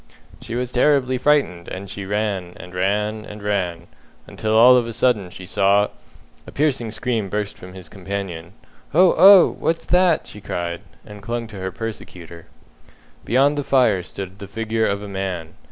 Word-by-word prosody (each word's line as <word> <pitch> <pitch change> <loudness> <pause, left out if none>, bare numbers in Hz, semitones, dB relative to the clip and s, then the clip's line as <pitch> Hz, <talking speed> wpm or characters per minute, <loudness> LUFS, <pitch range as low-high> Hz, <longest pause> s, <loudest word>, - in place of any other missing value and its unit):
"She 115 - -6
was 125 0 -3
terribly 130 -1 +2
frightened, 135 -13 +1
and 95 +2 -7
she 100 0 -7
ran, 100 -4 -2
and 90 - -11
ran, 105 +4 -1
and 105 -1 -10
ran, 95 -5 -2 0.4
until 110 0 -2
all 125 +3 +8
of 120 -2 +2
a 115 - -5
sudden 115 -5 +1
she 90 +1 -10
saw 100 +1 +2 0.3
" - - -30
A - - -9
piercing 135 -6 0
scream 110 -2 -2
burst 105 +1 -3
from 90 0 -12
his 95 -3 -11
companion. 95 -2 -6 0.4
"Oh! 180 +1 +6
oh! 195 -1 +8
What's 165 0 -1
that?" 180 -2 +3
she 105 - -11
cried, 85 -2 -4 0.2
and 105 -1 -11
clung 115 +3 -4
to 105 - -10
her 95 0 -4
persecutor. 85 -6 -8 0.8
Beyond 140 +5 +2
the - - -2
fire 125 -9 +3
stood 95 +2 -8
the 100 - -8
figure 110 +2 -1
of 100 0 -2
a - - -7
man. 95 -4 -5
105 Hz, 175 wpm, -21 LUFS, 95-120 Hz, 0.8 s, all